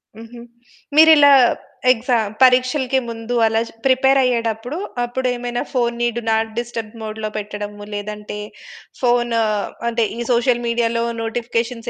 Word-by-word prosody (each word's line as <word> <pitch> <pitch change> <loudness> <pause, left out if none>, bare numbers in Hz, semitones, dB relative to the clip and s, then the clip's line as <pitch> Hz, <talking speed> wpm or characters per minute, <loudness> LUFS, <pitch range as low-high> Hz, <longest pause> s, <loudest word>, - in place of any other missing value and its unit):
హుహు. 230 +2 -11 0.5
మీరిలా 310 -2 +7 0.6
ఎక్సామ్ 230 -3 0
పరీక్షలకి 255 +1 +3
ముందు 230 +1 -5
అలా 225 0 +2 0.3
ప్రిపేరయ్యేటప్పుడు. 255 -1 +1 0.3
అప్పుడు 255 +2 -2
ఏమైనా 240 0 -3
ఫోనుని 240 -1 0
డు - - -2
నాట్ 225 0 +1
డిస్టర్బ్ 235 -2 -6
మోడ్‌లో 215 0 -5
పెట్టడము. 205 0 -6
లేదంటే, 210 0 -6 0.6
ఫోను 240 -2 +2 0.5
అంటే, 230 -1 0
ఈ - - -6
సోషల్ 240 0 +2
మీడియాలో 235 0 0 0.2
నోటిఫికేషన్స్ 230 +1 -3
235 Hz, 110 wpm, -19 LUFS, 225-250 Hz, 0.6 s, మీరిలా